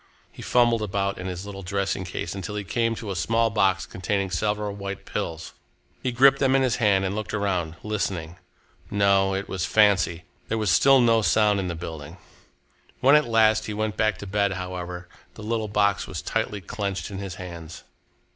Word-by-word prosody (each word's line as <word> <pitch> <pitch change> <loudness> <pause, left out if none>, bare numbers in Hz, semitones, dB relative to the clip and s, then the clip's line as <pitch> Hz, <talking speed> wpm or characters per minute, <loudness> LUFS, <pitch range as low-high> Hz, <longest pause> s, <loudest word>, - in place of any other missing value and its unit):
He - - -12
fumbled 120 -2 +3
about 100 -1 -2
in 95 - -5
his 90 +1 -5
little 100 -1 -7
dressing 95 0 -2
case 85 -1 -4
until 100 +1 -5
he 105 - -3
came 115 +5 0
to 105 -2 -6
a - - -3
small 115 +7 +1
box 95 -2 +2
containing 95 +1 -2
several 105 +3 -1
white 100 -1 -6
pills. 80 0 -5 0.5
He 130 - -1
gripped 135 +3 +5
them 135 -1 +3
in 135 - +3
his 125 -3 +1
hand 100 -5 +3
and 95 - -1
looked 110 +1 -4
around, 90 -6 -1
listening. 95 -6 -3 0.5
No, 100 -1 +3
it 100 +1 -3
was 95 -3 -3
fancy! 100 -5 +3 0.2
There 115 - -1
was 105 -4 +1
still 135 +9 +6
no 115 -2 +4
sound 105 -1 +3
in 95 - -2
the 85 - -3
building. 80 -1 -8 0.8
When 135 +3 +6
at 150 -1 +4
last 110 -1 +3
he 105 - -4
went 110 0 -2
back 110 -3 +1
to 100 - -8
bed, 100 0 0
however, 90 -1 -6 0.3
the 105 - -10
little 110 0 -1
box 100 -1 +1
was - - -6
tightly 105 -1 -2
clenched 100 +2 -4
in 95 - -5
his 95 -3 -6
hands. 85 -3 -9
100 Hz, 195 wpm, -25 LUFS, 95-110 Hz, 0.8 s, still